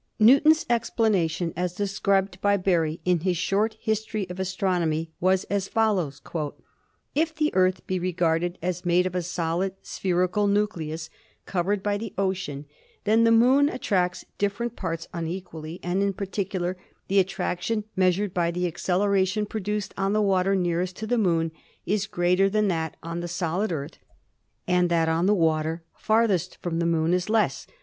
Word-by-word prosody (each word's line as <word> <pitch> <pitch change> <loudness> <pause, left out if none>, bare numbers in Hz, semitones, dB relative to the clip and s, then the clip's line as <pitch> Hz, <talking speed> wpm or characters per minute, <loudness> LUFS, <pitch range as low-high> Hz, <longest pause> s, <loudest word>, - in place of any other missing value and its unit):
Newton's 280 +8 +6
explanation, 200 -8 +1
as 180 0 -2
described 195 -1 0
by 200 0 +3
Berry 170 -4 +1
in 180 -1 +3
his 180 +1 0
'Short 205 +5 0
History 220 -2 -2
of 180 - -7
Astronomy/ 175 -4 -1
was 185 +1 +2
as 200 -1 -2
follows: 195 -11 0 0.9
"If 320 +2 0
the 305 0 0
Earth 185 0 +2
be 185 -1 -1
regarded 175 0 0
as 180 0 -2
made 175 0 +3
of 185 - -2
a 180 - 0
solid 175 +2 -2
spherical 185 +2 0
nucleus, 165 -6 -1 0.3
covered 190 +2 -1
by 205 0 0
the 220 -2 -7
ocean, 185 -7 -2 0.4
then 220 +2 +4
the 230 - +5
Moon 260 +5 +5
attracts 180 -9 -1
different 215 +4 -1
parts 165 -3 -4
unequally, 165 -1 -5
and 180 +2 0
in 200 0 +1
particular 190 -2 -3 0.3
the 195 +1 +3
attraction, 195 +3 -1
measured 185 +1 +2
by 170 -1 +1
the 180 +1 -1
acceleration 190 +3 +1
produced 210 -1 -3
on 195 +1 0
the 215 - +2
water 195 0 +2
nearest 180 0 0
to 220 - -5
the 240 +2 +1
Moon, 165 -5 +1 0.3
is 200 0 0
greater 180 +1 +2
than 210 0 +1
that 160 -3 -2
on 165 +1 -4
the 175 - -4
solid 175 +3 -1
Earth 145 -4 -5 0.7
and 180 -1 +3
that 165 -1 +2
on 165 +3 +2
the 210 - +4
water 160 -1 +1
farthest 220 -5 +1
from 170 -2 -2
the 170 - +1
Moon 165 0 +2
is 180 +2 0
less. 220 -1 +1
185 Hz, 160 wpm, -25 LUFS, 175-205 Hz, 0.9 s, Newton's